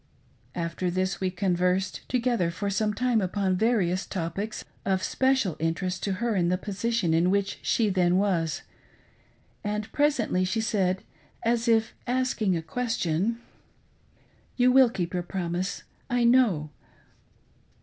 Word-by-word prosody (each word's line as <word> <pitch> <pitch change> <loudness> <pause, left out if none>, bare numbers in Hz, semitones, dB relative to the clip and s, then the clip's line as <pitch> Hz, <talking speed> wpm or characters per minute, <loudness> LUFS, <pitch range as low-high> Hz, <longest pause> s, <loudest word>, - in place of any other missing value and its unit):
After 170 +1 -2
this 185 +2 -1
we 190 - +1
conversed 180 0 0
together 240 -8 +1
for 200 +4 -3
some 210 +2 +1
time 240 +1 +1
upon 190 0 0
various 190 -4 +1
topics 195 +4 -4 0.2
of 190 -1 0
special 260 - +1
interest 180 +3 -1
to 200 - -1
her 230 +3 -1
in 175 -2 +2
the 180 - +2
position 205 -2 -1
in 170 +2 +3
which 200 0 0
she 225 - +2
then 180 -2 +2
was, 180 -5 0 1.0
and 210 0 -3
presently 280 -10 +1
she 190 +5 0
said, 195 -4 0 0.4
as 235 +1 +1
if 225 -1 +3
asking 245 -7 +1
a 165 - -5
question, 225 +1 -1 0.3
— - - -37
" - - -35
You 250 0 +5
will 260 -1 +6
keep 180 -6 -3
your 180 - 0
promise, 175 0 -3 0.3
I 245 0 +1
know." 230 -12 +3
195 Hz, 140 wpm, -27 LUFS, 180-230 Hz, 1.0 s, will